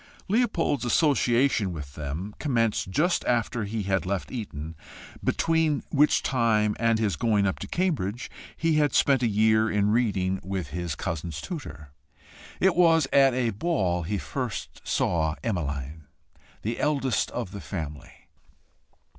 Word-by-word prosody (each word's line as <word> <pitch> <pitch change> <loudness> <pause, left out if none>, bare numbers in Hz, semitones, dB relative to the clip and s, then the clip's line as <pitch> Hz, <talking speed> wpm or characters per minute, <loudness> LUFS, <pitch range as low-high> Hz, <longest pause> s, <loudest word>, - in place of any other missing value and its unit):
Leopold's 200 - +1
association 125 - +2
with 75 -5 -7
them 80 +8 -5
commenced 115 -9 0
just 160 - +1
after 120 -1 0
he 105 +1 -3
had 95 0 0
left 95 +1 -3
Eton, 80 - -6 0.5
between 160 -3 +1
which 150 +1 +3
time 110 -4 +2
and 115 -1 +3
his 105 -5 0
going 105 +2 +2
up 95 - -1
to - - -6
Cambridge 135 - -1 0.3
he 160 -2 +2
spent 135 -2 +3
a 120 - +3
year 110 +1 +3
in 105 -1 +2
reading 100 -5 +1
with 95 -4 -4
his 85 -4 -3
cousins' 80 -1 -4
tutor. 75 - -7 0.7
It 190 -1 +3
was 165 -3 +5
at 135 -2 +5
a 120 -3 +1
ball 95 - 0
he 100 +5 -2
first 125 +2 -5
saw 80 -3 +1
Emmeline, 75 - -3 0.6
the 115 +3 -2
eldest 135 -6 +1
of 115 -6 -4
the 100 -1 -7
family. 75 -6 -7
110 Hz, 140 wpm, -26 LUFS, 90-135 Hz, 0.7 s, was